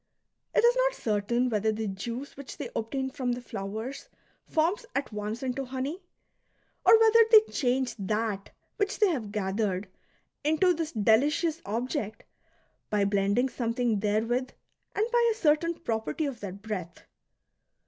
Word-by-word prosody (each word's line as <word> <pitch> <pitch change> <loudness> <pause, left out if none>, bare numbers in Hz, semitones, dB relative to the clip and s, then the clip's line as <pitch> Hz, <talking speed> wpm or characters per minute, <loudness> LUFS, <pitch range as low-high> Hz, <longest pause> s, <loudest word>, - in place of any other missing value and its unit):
It - - +4
is 480 +1 +6
not - - +2
certain 230 - 0
whether 220 -2 +1
the 215 0 -3
juice 235 +8 -5
which 275 -3 -9
they - - -5
obtain 265 +4 -2
from 255 -3 -1
the 245 - -4
flowers 220 +3 -6 0.4
forms 345 +9 +1
at 275 -5 -2
once 210 +4 -4
into 265 +1 -2
honey, 265 +7 -4 0.8
or 450 - +8
whether 450 0 +6
they 440 -2 +9
change 255 -1 0
that 210 0 -2 0.3
which 405 0 0
they 420 -3 +4
have 240 - -2
gathered 195 -1 -1 0.6
into 315 +5 +3
this 325 -1 -3
delicious 295 - +2
object 225 0 -3 0.7
by 205 -1 +2
blending 200 +5 +2
something 235 -3 0
therewith 225 +5 0 0.5
and 420 - +2
by 475 -1 +4
a - - -2
certain 335 -3 +2
property 230 +1 -2
of 270 -5 -4
their 195 -3 -5
breath. 195 -4 -6
245 Hz, 145 wpm, -28 LUFS, 215-305 Hz, 0.8 s, they